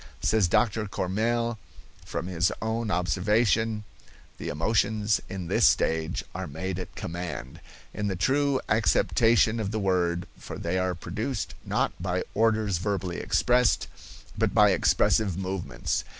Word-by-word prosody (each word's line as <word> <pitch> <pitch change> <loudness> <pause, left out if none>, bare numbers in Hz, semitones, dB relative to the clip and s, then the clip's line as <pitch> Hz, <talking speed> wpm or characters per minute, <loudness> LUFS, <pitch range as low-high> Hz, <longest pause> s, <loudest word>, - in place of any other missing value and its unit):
Says 110 -4 +2
Dr. 105 +2 +1
Courmelles, 115 +5 -1 0.5
from - - -3
his 90 -1 +1
own 110 0 -2
observation: 105 +5 +1 0.6
"The - - -5
emotions 105 +5 +1
in 95 -2 -5
this - - +4
stage 80 0 +1
are - - -4
made 95 0 -4
at 90 - -8
command, 85 - -6 0.3
in 105 - -2
the 95 - -1
true 135 +7 +2
acceptation 115 +1 +3
of 105 -3 -2
the 110 - -2
word, 90 -3 +1
for - - -8
they 90 +2 -1
are 90 -1 0
produced, 105 +7 -4
not - - 0
by 90 0 -1
orders 110 -4 +2
verbally 95 -2 -2
expressed, 125 -1 +2 0.5
but 105 -1 0
by 105 -2 +6
expressive 95 +1 +2
movements. 95 -8 -2
100 Hz, 135 wpm, -27 LUFS, 90-110 Hz, 0.6 s, by